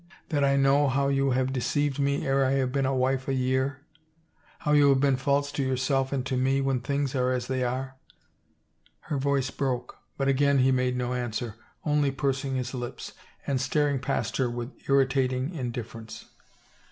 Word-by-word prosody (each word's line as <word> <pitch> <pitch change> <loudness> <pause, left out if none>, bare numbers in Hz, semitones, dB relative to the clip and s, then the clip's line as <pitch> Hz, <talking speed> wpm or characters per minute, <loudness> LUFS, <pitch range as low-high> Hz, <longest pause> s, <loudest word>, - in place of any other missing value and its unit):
That 145 -4 +1
I 140 0 +3
know 140 +1 +4
how 140 +1 +1
you 135 0 +2
have 130 +1 +1
deceived 145 +2 0
me 140 0 0
ere 135 0 +2
I 130 0 +2
have 130 -2 +1
been 135 0 +1
a 135 - 0
wife 130 +1 0
a 135 - 0
year, 130 +2 0 0.8
how 150 - 0
you 145 -1 +6
have 135 -1 +4
been 140 -1 +3
false 140 +2 0
to 145 - -2
yourself 130 +1 0
and 135 -2 -1
to 130 - -1
me 135 +2 +2
when 135 -2 +1
things 140 +2 -1
are 130 -1 +1
as 125 -2 -1
they 130 0 -1
are 130 +2 -2 0.4
— - - -43
" - - -37
her 145 - 0
voice 135 -1 0
broke, 125 -3 -3 0.2
but 135 - 0
again 140 +1 +3
he 130 0 +4
made 125 -1 +1
no 125 0 -1
answer, 120 -2 -3 0.3
only 150 -2 +2
pursing 135 0 -1
his 125 0 -3
lips 120 -2 -6 0.3
and 135 -2 0
staring 145 0 +1
past 135 +2 -2
her 130 -2 +1
with 120 +2 -5 0.2
irritating 130 +1 +2
indifference. 120 -5 -6
135 Hz, 190 wpm, -27 LUFS, 130-140 Hz, 0.8 s, you